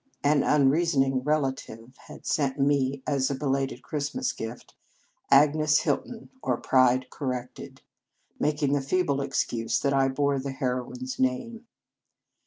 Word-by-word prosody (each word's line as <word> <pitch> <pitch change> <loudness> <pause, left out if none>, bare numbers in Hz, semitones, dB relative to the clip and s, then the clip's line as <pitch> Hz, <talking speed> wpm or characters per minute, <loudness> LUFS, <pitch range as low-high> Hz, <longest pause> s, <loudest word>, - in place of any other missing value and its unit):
An 145 0 +3
unrea 145 +2 +3
soning 135 -6 +1
relative 130 -5 -2
had - - -12
sent 140 -3 0
me 135 -1 +1
as 140 -3 0
a 140 - -1
be 145 - -6
lated 135 -2 -1
Christmas 155 - -2
gift, 115 +2 -8 0.6
"Agnes 150 +2 +4
Hilton; 225 - -3
or - - 0
Pride 130 0 +2
Corrected," 125 -4 -6 0.6
making 145 -1 +1
the 145 - +1
feeble 140 -1 0
excuse 115 -4 -1
that 140 -1 +1
I 135 -1 +3
bore 140 +1 0
the 135 0 -4
heroine 125 -1 -3
s 130 0 -6
name. 225 - -2
135 Hz, 140 wpm, -26 LUFS, 130-145 Hz, 0.6 s, Agnes